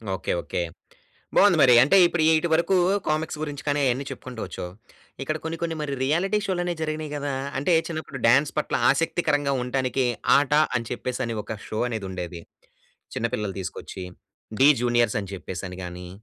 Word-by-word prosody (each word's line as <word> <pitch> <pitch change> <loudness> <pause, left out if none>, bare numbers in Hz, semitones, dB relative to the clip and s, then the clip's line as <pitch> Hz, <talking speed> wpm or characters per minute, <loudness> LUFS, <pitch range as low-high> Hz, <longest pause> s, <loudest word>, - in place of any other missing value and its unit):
Okay, - - -2
okay. - - -3 0.8
బాగుంది 195 -4 +6
మరి 125 -3 +7
అంటే 170 +9 +5
ఇప్పుడు 170 -1 0 0.2
ఇటు 170 - -1
వరకు 170 +4 +2 0.3
కామిక్స్ 155 0 -1
గురించి 145 -2 -5
కానీ 145 0 +1
అవన్నీ 130 +3 -1
చెప్పుకుంటూ 125 -2 -8
వచ్కావు. 90 - -7 0.5
ఇక్కడ 155 +3 -2
కొన్ని 160 +1 -3
కొన్ని 165 -1 -1
మరి 150 -2 -3
రియాలిటీ 175 +10 +1
షోలు 175 -2 -1
జరిగినాయి 155 -1 -3
కదా! 145 -1 -3 0.3
అంటే 145 +6 +1
చిన్నప్పుడు 155 -4 -5
డాన్స్ 140 +5 +4
పట్ల 150 - -1 0.2
ఆసక్తికరంగా 145 -1 +1
ఉండటానికి 130 +1 0 0.3
'ఆట' 145 +1 +2 0.2
అని 115 - 0
చెప్పేసి 125 0 -4
అని 115 - -3
ఒక 110 - -6
షో 110 - -4
అనేది 110 -4 -4
ఉండేది. 90 -2 -6 0.7
చిన్నపిల్లలు 105 -4 -2
తీసుకొచ్చి 95 +1 -7 0.6
'డీ 135 - +7
జూనియర్స్' 120 -1 +2
అని 100 -2 -8
చెప్పేసి 95 -1 -6
అని 90 - -8
గాని, 90 0 -7
140 Hz, 165 wpm, -25 LUFS, 115-155 Hz, 0.8 s, మరి